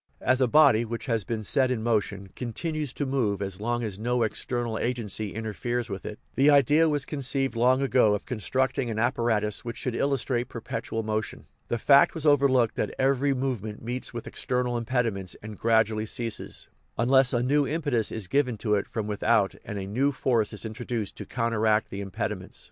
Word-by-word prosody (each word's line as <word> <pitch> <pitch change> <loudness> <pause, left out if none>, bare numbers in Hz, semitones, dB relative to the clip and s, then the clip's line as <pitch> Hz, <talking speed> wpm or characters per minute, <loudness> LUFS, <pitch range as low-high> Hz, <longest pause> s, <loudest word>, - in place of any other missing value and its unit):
As 130 +1 +2
a 130 - +4
body 120 -4 +5
which 115 +3 -5
has 115 -5 0
been 110 0 -3
set 130 +5 +3
in 120 -4 -1
motion 105 -4 -1
continues 150 +4 -3
to 145 - -2
move 125 -7 0
as 100 -1 -5
long 120 +2 -1
as 105 -3 -4
no 120 +1 +1
external 120 +1 -2
agency 110 -4 -2
interferes 115 +2 -3
with 95 - -5
it, 105 - -6 0.2
the 140 +2 +4
idea 145 +3 +5
was 145 -2 -1
conceived 135 -2 0
long 130 +3 +3
ago 125 -6 +4
of 105 - -6
constructing 130 +2 -1
an 110 - -3
apparatus 110 -2 0
which 115 -1 -6
should 125 - -3
illustrate 130 -2 0
perpetual 115 -1 -4
motion. 110 0 -3 0.2
The 120 - -1
fact 140 +7 +5
was 160 -2 -3
overlooked 135 -5 +4
that - - -2
every 135 +1 +2
movement 115 -6 -3
meets 125 +2 -4
with 120 -1 -6
external 125 -1 -2
impediments 115 -6 -1
and 110 0 -7
gradually 110 0 +2
ceases, 115 0 -3 0.3
un 120 - +1
less 130 -1 +5
a 120 -1 +1
new 140 +2 +2
impetus 145 -8 -1
is 110 -4 -3
given 125 0 +1
to 105 0 -1
it 100 - +1
from 110 -2 -3
without 105 -1 +2
and 105 - -6
a 95 - -4
new 130 +9 +1
force 120 -5 +1
is 105 +1 -5
introduced 110 -1 -4
to - - -8
counteract 110 -2 +1
the 100 - -4
impediments. 95 -2 -5
120 Hz, 190 wpm, -27 LUFS, 110-130 Hz, 0.3 s, body